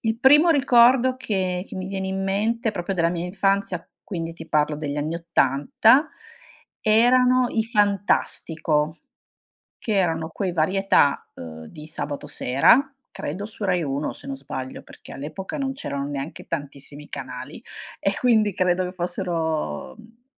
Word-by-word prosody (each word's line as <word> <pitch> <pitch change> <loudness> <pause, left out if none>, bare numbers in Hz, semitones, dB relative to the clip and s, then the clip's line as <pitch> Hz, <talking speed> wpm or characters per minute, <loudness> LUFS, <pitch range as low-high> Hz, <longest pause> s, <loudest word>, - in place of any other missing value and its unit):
il 225 0 -1
primo 295 +6 +7
ricordo 255 -3 +5
che 190 -6 -2
che - - -9
mi 185 0 -4
viene 190 -1 -3
in 190 0 -2
mente, 215 +4 0
proprio 195 0 -3
della 170 -2 +2
mia 175 0 -3
infanzia, 195 -1 0 0.2
quindi 165 -4 -5
ti 165 - -11
parlo 150 0 +1
degli 150 -1 -4
anni 155 +3 -2
80, 170 - +3 0.7
erano 250 +3 +4
i 220 - 0
Fantastico. 175 -7 0 0.9
Che 220 - +1
erano 165 -3 0
quei 185 +1 -2
varietà, 175 -3 +2
uhm, 80 -1 -9
di 150 - -11
sabato 145 -2 -4
sera, 150 - +3 0.2
credo 185 +8 -5
su 215 0 -11
Rai 180 -3 +1
Uno 140 +1 -2
se - - -13
non 275 - -4
sbaglio, 130 - -7
perché - - -14
all'epoca 160 - -6
non 270 -1 -1
c'erano 140 - -4
neanche 145 +1 -6
tantissimi 145 -1 -6
canali - - -7 0.4
e - - +1
quindi 220 -5 +3
credo 180 0 +1
che 180 - -5
fossero, 170 - -3
mhmm, 230 +2 -19
185 Hz, 145 wpm, -23 LUFS, 155-225 Hz, 0.9 s, primo